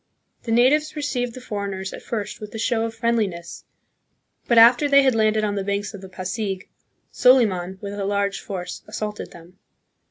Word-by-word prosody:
The 230 Hz, -, -3 dB
natives 285 Hz, +7 st, +3 dB
received 250 Hz, -5 st, -2 dB
the 255 Hz, -, -9 dB
for 205 Hz, -4 st, -4 dB
eigners 190 Hz, 0 st, -5 dB
at -, -, -8 dB
first 215 Hz, -3 st, -5 dB
with 210 Hz, +1 st, -8 dB
a -, -, -3 dB
show 225 Hz, 0 st, 0 dB
of 225 Hz, 0 st, -5 dB
friendliness, 215 Hz, -7 st, -2 dB, 0.8 s
but 235 Hz, -, +3 dB
after 245 Hz, +5 st, +7 dB
they 280 Hz, 0 st, +6 dB
had 265 Hz, -1 st, +3 dB
landed 215 Hz, -1 st, +2 dB
on 205 Hz, -1 st, 0 dB
the 200 Hz, -1 st, -2 dB
banks 200 Hz, +2 st, -2 dB
of 200 Hz, -, -9 dB
the 190 Hz, -, -10 dB
Pasig, 190 Hz, +1 st, -4 dB, 0.5 s
Soliman, 190 Hz, -8 st, +3 dB
with 200 Hz, 0 st, -5 dB
a 200 Hz, -1 st, -3 dB
large 200 Hz, 0 st, 0 dB
force, 180 Hz, -2 st, -6 dB
assaulted 210 Hz, -1 st, -5 dB
them. 175 Hz, +2 st, -16 dB
210 Hz, 185 wpm, -23 LUFS, 195-235 Hz, 0.8 s, after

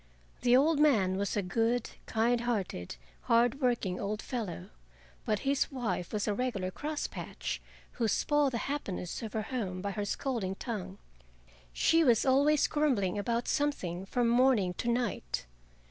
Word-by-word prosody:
The 245 Hz, 0 st, +5 dB
old 300 Hz, +2 st, +3 dB
man 215 Hz, -12 st, +4 dB
was 200 Hz, +1 st, -1 dB
a 205 Hz, -, +1 dB
good, 230 Hz, +6 st, 0 dB, 0.2 s
kind 235 Hz, +2 st, +2 dB
hearted, 200 Hz, -, -2 dB, 0.3 s
hard 240 Hz, +4 st, +3 dB
working 235 Hz, -8 st, 0 dB
old 210 Hz, +1 st, -2 dB
fellow, 220 Hz, -, -5 dB, 0.5 s
but 210 Hz, -2 st, 0 dB
his 275 Hz, +1 st, +1 dB
wife 215 Hz, -10 st, -2 dB
was 210 Hz, -1 st, -1 dB
a 210 Hz, -, +2 dB
regular 200 Hz, -5 st, -2 dB
cross 300 Hz, +7 st, -3 dB
patch, -, -, -5 dB, 0.3 s
who 230 Hz, -, -1 dB
spoiled 290 Hz, +4 st, +2 dB
the -, -, 0 dB
happiness 200 Hz, -11 st, -4 dB
of 220 Hz, -2 st, -6 dB
her 220 Hz, -, -1 dB
home 190 Hz, -7 st, -2 dB
by 200 Hz, +2 st, -3 dB
her 205 Hz, +1 st, -3 dB
scolding 205 Hz, -4 st, -2 dB
tongue. 195 Hz, -4 st, -5 dB, 0.7 s
She 330 Hz, -, +3 dB
was 240 Hz, -4 st, +4 dB
always 285 Hz, +3 st, +4 dB
grumbling 235 Hz, -10 st, +1 dB
about 235 Hz, +3 st, -1 dB
something 195 Hz, -, -1 dB
from 240 Hz, +3 st, +1 dB
morning 235 Hz, -6 st, +3 dB
to 240 Hz, -, -2 dB
night. 205 Hz, -, -1 dB
230 Hz, 155 wpm, -31 LUFS, 195-260 Hz, 0.7 s, The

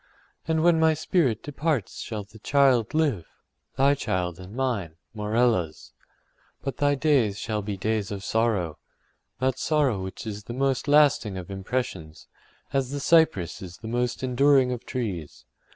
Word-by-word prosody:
And 160 Hz, -1 st, +1 dB
when 170 Hz, -1 st, +5 dB
my 160 Hz, -1 st, +4 dB
spirit 150 Hz, -, +1 dB
departs 145 Hz, -, -2 dB
shall 110 Hz, -2 st, -5 dB
the 105 Hz, +2 st, -16 dB
child 130 Hz, -1 st, +3 dB
live—thy 140 Hz, -, -1 dB
child 90 Hz, -9 st, -2 dB
and 95 Hz, +4 st, -10 dB
mine, 115 Hz, -12 st, -2 dB, 0.2 s
Morella’s. 105 Hz, -6 st, 0 dB, 0.7 s
But 135 Hz, -, -4 dB
thy 145 Hz, 0 st, +2 dB
days 130 Hz, -8 st, +2 dB
shall 105 Hz, -1 st, -2 dB
be 100 Hz, -1 st, -4 dB
days 105 Hz, +1 st, -1 dB
of 100 Hz, -2 st, -5 dB
sorrow—that 115 Hz, -, -3 dB
sorrow 140 Hz, -10 st, +1 dB
which 95 Hz, +3 st, -7 dB
is 105 Hz, -1 st, -6 dB
the 120 Hz, -, -6 dB
most 135 Hz, +1 st, 0 dB
lasting 145 Hz, -9 st, +4 dB
of 90 Hz, +1 st, -7 dB
impressions, 95 Hz, -6 st, -4 dB, 0.5 s
as 135 Hz, -2 st, 0 dB
the 145 Hz, +1 st, -3 dB
cypress 150 Hz, -, +3 dB
is 90 Hz, -2 st, -9 dB
the 110 Hz, -, -9 dB
most 120 Hz, +2 st, -1 dB
enduring 130 Hz, 0 st, +4 dB
of 125 Hz, -2 st, -5 dB
trees. 90 Hz, -, -4 dB
120 Hz, 145 wpm, -26 LUFS, 100-140 Hz, 0.7 s, when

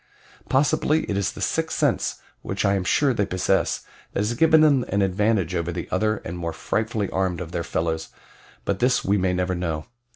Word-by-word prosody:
Possibly 150 Hz, +3 st, +2 dB
it 100 Hz, -, -3 dB
is 100 Hz, -1 st, 0 dB
the -, -, -10 dB
sixth -, -, -1 dB
sense -, -, +1 dB, 0.2 s
which -, -, -2 dB
I 100 Hz, -, +3 dB
am 95 Hz, -2 st, 0 dB
sure 135 Hz, +8 st, +2 dB
they 105 Hz, -, +1 dB
possess 90 Hz, 0 st, +1 dB, 0.3 s
that -, -, 0 dB
has 105 Hz, +3 st, 0 dB
given 160 Hz, +4 st, +5 dB
them 145 Hz, -5 st, +5 dB
an 100 Hz, +1 st, +1 dB
advantage 95 Hz, -2 st, +1 dB
over 85 Hz, -1 st, -1 dB
the 85 Hz, -1 st, -5 dB
other 110 Hz, +3 st, +1 dB
and 85 Hz, +1 st, -5 dB
more 85 Hz, -1 st, -3 dB
frightfully 110 Hz, +3 st, -1 dB
armed 95 Hz, -2 st, 0 dB
of 85 Hz, -2 st, -6 dB
their 85 Hz, -, -2 dB
fellows; 80 Hz, 0 st, -2 dB, 0.6 s
but 100 Hz, -1 st, -1 dB
this 125 Hz, +1 st, +2 dB
we 100 Hz, +1 st, +2 dB
may 90 Hz, 0 st, +1 dB
never 90 Hz, 0 st, 0 dB
know. 80 Hz, -3 st, -3 dB
95 Hz, 200 wpm, -24 LUFS, 90-110 Hz, 0.6 s, given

